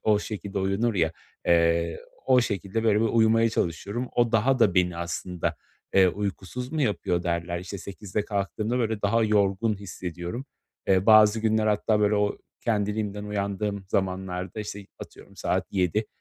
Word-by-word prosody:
o 105 -1 +3
şekilde 105 -2 -5
uyunur 100 +5 0
ya, 80 -3 +1 0.3
eee, 85 -1 +2 0.3
o 130 -1 +5
şekilde 100 -1 -2
böyle 105 -2 +4
bir 115 - +2
uyumaya 115 0 +4
çalışıyorum. 100 +7 -2
O 120 -1 +3
daha 125 +4 +3
da 105 -7 +4
beni 90 -2 +2
aslında, 85 +1 -3 0.4
eee, 95 -1 +6
uykusuz 105 - -4
mu 155 -2 0
yapıyor 90 -7 0
derler. 85 0 -2
İşte 95 +2 -7
8.00'de 100 +2 -4
kalktığımda 105 +4 -2
böyle 110 -3 -1
daha 110 +3 +3
yorgun 105 +1 +2
hissediyorum. 90 +3 -6 0.4
Eee, 95 +1 +3
bazı 110 0 +7
günler 110 0 +2
hatta 105 0 +2
böyle, 105 0 +3
o 105 0 0 0.2
kendiliğimden 105 -1 -1
uyandığım 100 0 -2
zamanlarda, 95 +1 -2
işte, 100 -1 -7
atıyorum, - - -12
saat - - -1
7.00, 95 +3 0
105 Hz, 150 wpm, -26 LUFS, 95-110 Hz, 0.4 s, bazı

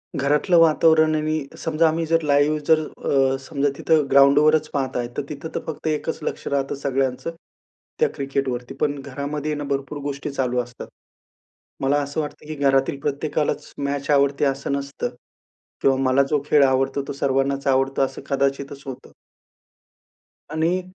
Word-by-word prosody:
घरातलं 150 +5 +2
वातावरण 160 -1 +5
आणि 155 -1 -1
समजा 165 0 +1
आम्ही 165 +1 0
जर 165 +1 +2
लाईव्ह, 145 +1 +3
जर 160 -1 +5 0.2
अ, 135 -1 +1
समजा 140 +1 -1
तिथं 155 -3 +2
ग्राउंडवरच 150 +3 +5
पाहताय, 130 -3 -1
तर - - +1
तिथं 150 +2 -6
तर - - 0
फक्त 160 0 -5
एकच 155 +1 -2
लक्ष - - -4
राहतं 140 -1 -1
सगळ्यांचं 135 +2 -1 0.7
त्या 465 - +3
क्रिकेटवरती. 135 -3 -3
पण 145 -1 0
घरामध्ये 145 +2 -4
आहे 150 - -2
ना 145 - -4
भरपूर 140 +1 -2
गोष्टी 140 0 -4
चालू 125 -2 -1
असतात. 120 0 -9 0.9
मला 135 +2 +2
असं 145 +2 -2
वाटतं, 150 0 -7
की 155 - -5
घरातील 135 -1 +2
प्रत्येकालाच 150 +1 -2
मॅच 140 0 -3
आवडते, 140 0 +3
असं 135 0 -1
नसतं 140 -3 -3 0.7
किंवा 135 -1 +4
मला 135 +1 +3
जो 150 -2 +1
खेळ 150 -1 +5
आवडतो, 135 +1 +1
तो - - -4
सर्वांनाच 140 0 0
आवडतो, 135 0 +2
असं 135 - -3
कदाचितच 140 0 -1
होतं. 130 -2 -8 1.4
आणि 165 +4 +1
140 Hz, 150 wpm, -22 LUFS, 135-150 Hz, 1.4 s, वातावरण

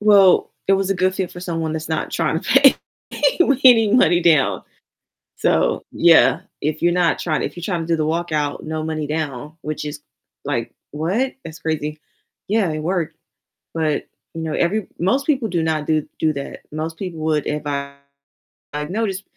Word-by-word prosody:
Well, 200 -3 +5 0.2
it 195 - +4
was 195 0 +1
a - - +2
good 185 +1 +1
fit 190 -2 -2
for 175 - -9
someone 165 -3 -3
that's 160 0 -4
not 160 - -2
trying 160 - 0
to - - -9
pay 275 -1 +7 0.3
pay - - +1 0.3
any 225 -5 +7
money 180 -8 +4
down, 135 - +3 0.7
so - - +1
yeah, - - +5 0.2
if 155 +1 -2
you're 175 0 +4
not 175 -1 +2
trying 155 -3 -1
if - - -4
you're 175 - -8
trying 175 -3 -2
to 165 - -5
do 165 -1 +1
the 155 - 0
walkout, 155 -3 -1
no 155 0 -4
money 155 -1 -3
down, 150 -1 -4
which 155 0 -4
is, 150 0 -6 0.4
like, 125 -5 -3 0.2
"What? 190 - -1
That's 160 0 -9
crazy," 155 -1 -3 0.5
yeah, 205 -4 +2
it 155 - -3
worked, 170 0 -2 0.6
but, 155 -2 -1 0.3
you 165 - -5
know, 160 -1 -3
every 195 +3 0
most 255 +11 +1
people 265 -7 +1
do 170 -2 0
not 155 -2 -1
do 155 -2 +1
do 155 -1 +2
that. 140 -1 -7
Most 160 +2 -4
people 180 -4 -6
would 155 -2 0
if 150 0 -2
I 140 -1 -3 0.8
I've 150 +1 -4
noticed, 200 -1 -2
160 Hz, 185 wpm, -20 LUFS, 155-185 Hz, 0.8 s, pay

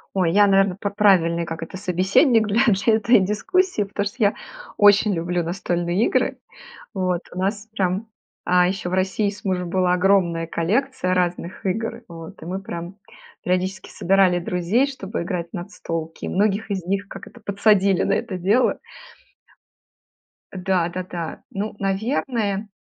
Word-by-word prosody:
Ой, 175 -3 +2
я, 205 +1 +6
наверно, 195 -1 +3
п 200 0 -3
правильный, 180 -5 +3
как 165 0 -6
это, 175 - -7
собеседник 200 - +3
для 220 +5 +2
для 220 +1 +3
этой 225 -1 +4
дискуссии, 365 - +1
потому 200 0 -3
что 205 - -5
я 200 - +3 0.4
очень 205 0 +5
люблю 175 +1 -1
настольные 175 +2 -1
игры. - - 0 0.6
Вот 185 -2 -1
у 180 - -6
нас 205 +3 -2
прям 190 +1 -1 0.4
А, 180 0 +5
ещё 185 0 -2
в 185 - -2
России 190 +2 +1
с 200 0 -13
мужем 180 -2 -1
была 185 -1 +2
огромная 180 -3 +2
коллекция 195 +5 -1
разных 180 +1 -2
игр, 225 +5 -3
вот, 165 -2 -11
и - - -8
мы 190 +2 -4
прям 175 0 -7 0.5
периодически 185 +1 -1
собирали 190 -1 +3
друзей, 180 +9 +1
чтобы 210 -10 -5
играть 170 -1 -4
в - - -23
настолки, 165 -4 -6
и - - -2
многих 210 +2 0
из 190 -2 -2
них, 195 +2 -2
как - - -9
это, 240 - -15
подсадили 200 -2 +3
на 195 - 0
это 200 -4 -3
дело. 205 +8 +2 1.7
Да, 185 -2 0
да, 185 +1 -4
да. 170 -3 -6
Ну, 205 +2 -4
наверное, 210 0 -1
190 Hz, 160 wpm, -22 LUFS, 180-205 Hz, 1.7 s, я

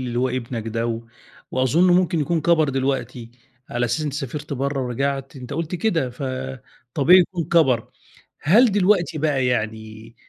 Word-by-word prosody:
اللي 120 -2 -3
هو 130 +1 +1
ابنك 120 -3 -4
ده 115 +1 -2
و 115 0 -3 0.5
وأظُن 155 +8 +3
ممكن 175 -2 +2
يكون 165 +3 0
كَبَر 160 -1 +3
دلوقتي 135 -3 -2 0.4
على 120 +1 -1
أساس 120 +5 -1
أنت 145 - -3
سافرت 145 +1 -5
برّه 140 +1 -2
ورجعت، 135 +3 -3
أنت 130 +1 -8
قُلت 165 +3 -3
كده، 165 - 0
فطبيعي 130 +5 +1
يكون 175 -1 -2
كَبَر. 135 -8 +2 0.5
هل 215 - +5
دلوقتي 185 -4 +2
بقى 140 -4 +1
يعني 110 -1 -4
135 Hz, 150 wpm, -22 LUFS, 125-165 Hz, 0.5 s, هل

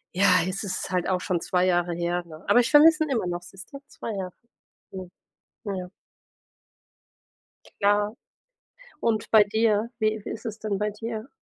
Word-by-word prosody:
Ja, 185 -2 +5
es 185 +3 -3
ist 195 - -3
halt 180 -2 -1
auch 185 -1 0
schon 180 -2 -1
2 180 +2 0
Jahre 175 -1 +1
her, 175 +1 -2
ne? 160 -1 -13
Aber 245 - +5
ich 245 +3 +1
vermisse 315 +2 +7
ihn 310 - -4
immer 225 -8 0
noch, 175 0 -4
siehste? 195 +9 -11
2 230 - -7
Jahre. 185 -2 -5 0.6
Mhm. 185 -2 -8 0.5
Ja. 185 -3 -4 1.9
Klar. 205 +1 +2 0.9
Und 220 -2 -1
bei 215 -2 +7
dir, 220 +1 +1
wie 215 -1 0
wie - - -6
ist 225 - -7
es 220 -1 -5
denn 210 -2 -2
bei 210 +1 -1
dir? 220 +2 -6
200 Hz, 170 wpm, -25 LUFS, 180-220 Hz, 1.9 s, vermisse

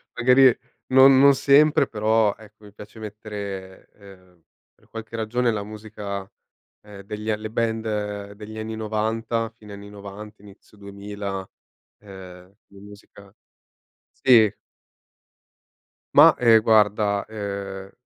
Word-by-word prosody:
Magari 125 0 +5 0.3
non 130 0 +6
non 140 0 +7
sempre 145 +3 +4
però, 110 -1 +1
ecco, 110 0 -18
mi 100 - -16
piace 105 +2 -13
mettere, 100 -3 -8
ehm, 90 -4 -19 0.3
per - - -30
qualche 115 0 -9
ragione 115 +2 -1
la 105 -2 -4
musica, 105 -2 -8 0.5
ehm, 105 -1 -13
degli 105 +2 -6
a 105 - 0
le 110 0 -8
band 105 -3 -3
degli 105 +1 -10
anni 110 0 -6
'90, 110 +1 -2
fine 105 -2 -14
anni 100 0 -11
'90, 105 +1 -11
inizio 100 +1 -18
2000, 100 -1 -7 0.5
ehm, 95 -2 -13
la 100 0 -17
musica 100 0 -16 0.8
sì. 115 -6 +4 1.6
Mah, - - +8
ehm, 115 -2 +5
guarda, 105 -2 +2
ehm, 100 -2 -7
105 Hz, 120 wpm, -23 LUFS, 100-110 Hz, 1.6 s, Mah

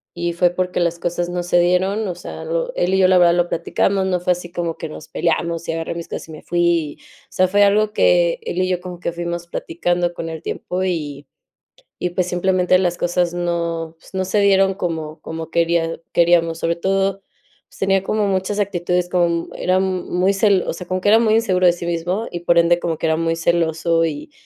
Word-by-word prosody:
y 170 0 -2
fue 175 +1 +3
porque 180 +1 -2
las 170 0 0
cosas 175 0 -2
no 175 0 -2
se 175 0 +2
dieron, 190 +5 +1
o 180 - -3
sea, 175 - -8
lo - - -2
él 180 - 0
y - - +2
yo 190 -1 +5
la 185 0 +5
verdad 170 -1 +5
lo 175 0 +2
platicamos, 190 +3 0
no 180 -1 0
fue 180 +1 0
así 175 -1 -9
como 170 -2 -3
que 160 - -6
nos 155 0 -10
peleamos 170 0 -1
y - - +2
agarré 165 0 -3
mis 170 -1 -6
cosas - - -6
y - - -11
me 155 - -10
fui. 170 -3 0 0.3
O - - -54
sea, 185 - +2
fue 205 +2 +4
algo 210 +1 +3
que - - +3
él 465 - -5
y 185 - +1
yo 180 -1 -1
como 180 -1 -8
que 170 - -2
fuimos 170 0 -4
platicando 175 +1 -1
con 165 - -6
el 160 -1 -6
tiempo 185 +1 -4
y 150 -6 -3 0.7
y, 180 - -2
pues, 175 0 -1
simplemente, 180 0 +2
las 175 -1 0
cosas 175 0 0
no, 170 -2 -2
pues, - - -18
no 190 -1 -1
se 195 +3 +1
dieron 195 -1 +4
como 160 -4 -4
como 160 0 -7
quería 165 -1 +1
queríamos. 170 -1 +3
Sobre 165 0 0
todo, 195 +2 0 0.5
pues, - - -19
tenía 195 -1 +2
como 210 +1 0
muchas 195 +1 -1
actitudes, 180 -3 0
como 175 -1 +2
mu 170 0 -2
era 185 +1 +1
muy 185 0 0
cel 195 -2 +3
o - - -1
sea, 175 +2 -8
como 185 0 -1
que 195 - 0
era 220 +2 +6
muy 220 -2 +3
inseguro 190 -5 +1
de 175 - +6
sí 175 0 -6
mismo 175 +6 -2
y, 175 - -4
por 170 0 +3
ende, 170 +1 +4
como 165 -2 -2
que - - -1
era 160 0 +2
muy 165 0 0
celoso 165 0 +1
y 295 - -4
175 Hz, 230 wpm, -20 LUFS, 170-190 Hz, 0.7 s, era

